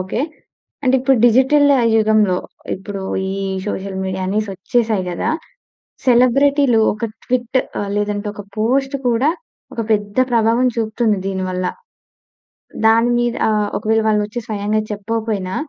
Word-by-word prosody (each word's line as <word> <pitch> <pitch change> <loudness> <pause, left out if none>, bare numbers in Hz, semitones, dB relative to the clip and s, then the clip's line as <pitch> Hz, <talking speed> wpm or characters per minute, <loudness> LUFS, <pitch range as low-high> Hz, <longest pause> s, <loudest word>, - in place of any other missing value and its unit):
Okay. 190 +6 -3 0.6
అంటే 260 0 +2
ఇప్పుడు 265 0 +3
digital 265 +5 +4 0.3
యుగంలో 215 -4 +3 0.4
ఇప్పుడు, 195 +1 -7 0.3
ఈ - - -2 0.3
సోషల్ 195 -1 -4
మీడియా 190 0 -3
అనే‌సి 210 +2 -1
వచ్చేసాయి 215 0 0
కదా! 175 - -2 0.8
సెలబ్రిటీలు 255 0 +4
ఒక 215 +2 -5 0.2
ట్విట్ 250 +1 0 0.2
ఆహ్, 200 -1 -3
లేదంటే 205 0 -2
ఒక 205 - -7
పోస్ట్ 270 +5 0
కూడా 245 +6 +2 0.4
ఒక 230 - -3
పెద్ద 205 +2 -1
ప్రభావం 230 +2 +3
చూపుతుంది 220 -1 0
దీని 190 -1 -2
వల్ల. 185 0 -2 1.2
దాని 230 +2 +4
మీద 240 0 0
ఆహ్, 210 -1 +1
ఒకవేళ 220 +1 +1
వాళ్ళు 210 -1 +2
వచ్చి 230 +3 -5
స్వయంగా 210 0 -1
చెప్పకపోయినా, 210 -2 -3
220 Hz, 130 wpm, -18 LUFS, 205-240 Hz, 1.2 s, digital